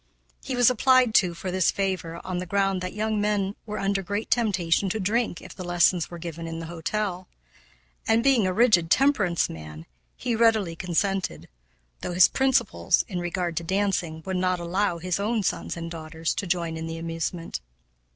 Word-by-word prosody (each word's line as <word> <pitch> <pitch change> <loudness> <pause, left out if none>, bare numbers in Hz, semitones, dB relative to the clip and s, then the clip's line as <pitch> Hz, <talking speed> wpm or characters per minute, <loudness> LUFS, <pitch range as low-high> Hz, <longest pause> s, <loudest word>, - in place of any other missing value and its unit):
He 260 - -3
was 245 0 +5
applied 255 -1 +4
to 180 -5 +3
for 185 +2 -5
this 185 -1 +2
favor 185 -4 -2
on 185 -1 -3
the 180 - -5
ground 195 0 +1
that 185 +1 -5
young 215 0 0
men 205 -1 0
were 210 0 -4
under 195 0 0
great 205 +4 -4
temptation 195 -5 +2
to 220 - -2
drink 215 0 -1
if - - -10
the 185 - -8
lessons 175 -1 +2
were 175 - -8
given 165 -1 -6
in 165 0 -5
the 165 - -5
hotel; 180 +3 -3 0.8
and, 225 +1 +3
being 255 -7 +4
a - - +1
rigid 185 -6 +4
temperance 210 -9 +3
man, 80 0 -9 0.3
he 240 -2 -1
readily 220 -7 +3
consented, 190 +2 -1 0.5
though 180 - -4
his 180 0 +7
principles, 245 - +2
in 180 -3 -4
regard 175 -1 -2
to 170 - -1
dancing, 180 -3 -1
would 190 -1 -2
not 185 0 +1
allow 175 +1 0
his 180 +2 -2
own 215 +1 0
sons 175 - -2
and 165 0 -6
daughters 160 0 -3
to 200 - -4
join 170 -2 -1
in 160 0 -5
the 165 0 -5
amusement. 165 - -4
185 Hz, 185 wpm, -25 LUFS, 170-210 Hz, 0.8 s, his